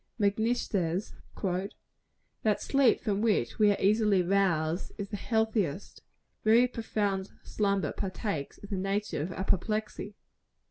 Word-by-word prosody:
Macnish 220 +4 +1
says 180 0 -1 1.3
"That 215 -2 +2
sleep 275 -4 +3
from 205 -1 0
which 205 - +1
we 210 -1 +6
are 200 - -1
easily 205 -2 +3
roused, 175 -3 +1
is 200 -1 -5
the 210 - -4
healthiest; 215 - -1 0.4
very 230 +3 +5
profound 205 -5 -2
slumber 200 -2 0
partakes 185 - -4
of 200 - -10
the 195 - -1
nature 195 -2 -1
of 170 +5 -3
apoplexy." 210 +2 -2
200 Hz, 125 wpm, -29 LUFS, 190-215 Hz, 1.3 s, we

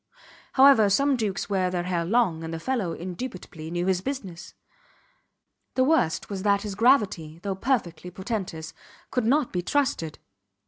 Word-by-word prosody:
However, 265 -6 +7
some 275 +7 +3
dukes 210 -5 -2
wear 190 -2 +1
their 180 -1 -2
hair 175 -1 -1
long, 185 -5 +1
and 160 - -5
the 165 - -4
fellow 215 -5 -1
indubitably 180 -3 -7
knew 175 +1 -2
his 185 -1 +1
business. 195 -9 -6 1.2
The 260 - +4
worst 265 - +2
was 195 -2 -5
that 200 0 +2
his 210 -2 -4
gravity, 200 - +2
though 200 -1 -1
perfectly 190 -5 -1
portentous, 180 -5 -5 0.4
could 250 -3 0
not 275 +3 +2
be 180 - 0
trusted. 180 - -1
195 Hz, 150 wpm, -26 LUFS, 175-245 Hz, 1.2 s, However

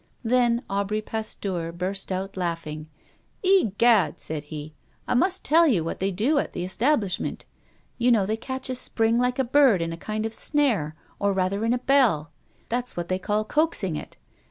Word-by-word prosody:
Then 240 0 +2
Aubry 200 +2 -1
Pasteur 195 -6 -4
burst 185 +3 -3
out 190 +1 -3
laughing: 165 -4 -4 0.5
"Egad," 235 - +3
said 155 -1 -2
he, 150 0 -8 0.3
"I - - +1
must 370 +10 +1
tell 330 +2 +5
you 200 - +2
what 165 - -4
they 195 - +1
do 240 - +1
at - - -3
the - - -3
establishment. 210 +1 -1 0.5
You 245 +1 +3
know 215 -5 +3
they 215 +3 -1
catch 260 +3 -5
a - - -1
spring 230 -2 +1
like 250 0 +1
a 265 - +2
bird 260 -5 +4
in 165 0 -2
a - - -7
kind 215 +4 -3
of 225 - -3
snare, 225 - +1 0.2
or 200 0 +1
rather 190 +2 0
in 230 - +1
a 245 - +2
bell. 245 - +2 0.4
That's 245 -2 -2
what 175 0 -4
they 185 0 0
call 210 +3 -1
coaxing 295 - 0
it. - - -8
215 Hz, 180 wpm, -25 LUFS, 180-250 Hz, 0.5 s, tell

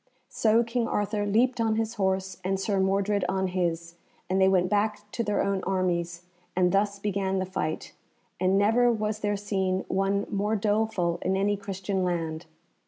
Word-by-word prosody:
So 225 +1 +3
King 230 0 -1
Arthur 205 -1 -1
leaped 240 +4 +2
on 220 -1 +2
his 225 0 -1
horse, 190 -3 -1
and 190 +1 0
Sir 195 0 0
Mordred 195 +1 +1
on 190 0 0
his, 170 -2 -2 0.4
and 190 +1 +2
they 190 - +6
went 185 -1 +3
back 210 +2 0
to 235 - -2
their 210 -2 0
own 195 -1 -1
armies, 175 -2 -1 0.3
and 180 -1 +3
thus 200 +1 +1
began 195 -1 -1
the 185 - 0
fight, 160 -4 -4 0.5
and 185 +1 +3
never 225 +4 +4
was 215 -1 -2
there 205 -1 0
seen 190 -2 -1
one 195 +1 +1
more 210 +1 0
doleful 205 -5 0
in 190 +1 0
any 205 +1 +1
Christian 195 -1 -3
land. 165 -2 -2
195 Hz, 170 wpm, -27 LUFS, 185-210 Hz, 0.5 s, they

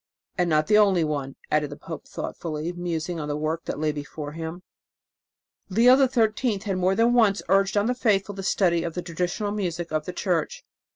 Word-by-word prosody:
And 180 -1 +1
not 155 -1 +3
the 210 +4 +5
only 195 -5 +4
one," 145 -3 -3 0.2
added 150 -1 +2
the - - -8
pope - - -8
thoughtfully, 160 +1 -5
musing 175 -1 -3
on 150 - -4
the 145 0 -2
work 155 +2 -2
that - - -4
lay 155 0 0
before 145 0 -6
him. 165 +3 -6 1.1
Leo 235 +6 +6
XIII 245 -4 +2
had 195 -2 -1
more 185 +1 +2
than 230 +2 +3
once 220 -5 +3
urged 195 +2 +3
on 205 - +3
the 245 - +1
faithful 205 -5 +1
the 195 - -6
study 180 -3 +2
of 165 -1 -4
the 180 - -3
traditional 180 +4 -2
music 175 -5 -3
of 155 -1 -1
the 180 - -4
Church. 175 -4 -1
180 Hz, 195 wpm, -25 LUFS, 160-205 Hz, 1.1 s, Leo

